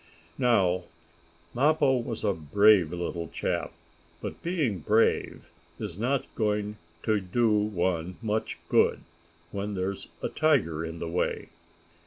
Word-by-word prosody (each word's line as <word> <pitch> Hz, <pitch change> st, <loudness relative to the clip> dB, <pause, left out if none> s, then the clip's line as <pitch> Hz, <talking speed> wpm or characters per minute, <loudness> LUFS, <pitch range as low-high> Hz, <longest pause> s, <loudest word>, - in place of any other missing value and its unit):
Now 95 Hz, -8 st, +3 dB, 0.7 s
Mappo 145 Hz, +1 st, +3 dB
was 115 Hz, -2 st, -4 dB
a 100 Hz, -2 st, +2 dB
brave 95 Hz, +2 st, +4 dB
little 85 Hz, -1 st, -3 dB
chap, -, -, -2 dB, 0.5 s
but -, -, -6 dB
being 155 Hz, -, 0 dB
brave 110 Hz, +8 st, +1 dB, 0.3 s
is -, -, -5 dB
not 125 Hz, +7 st, 0 dB
going 105 Hz, -1 st, -1 dB, 0.3 s
to 110 Hz, -1 st, +2 dB
do 110 Hz, +5 st, +1 dB
one 95 Hz, -4 st, 0 dB
much 110 Hz, -1 st, -2 dB
good, -, -, +3 dB, 0.5 s
when 100 Hz, 0 st, -3 dB
there's 95 Hz, +1 st, -3 dB, 0.2 s
a -, -, 0 dB
tiger 110 Hz, -, +2 dB
in 80 Hz, 0 st, -5 dB
the 80 Hz, -, -4 dB
way. 85 Hz, +2 st, -1 dB
105 Hz, 125 wpm, -28 LUFS, 90-115 Hz, 0.7 s, brave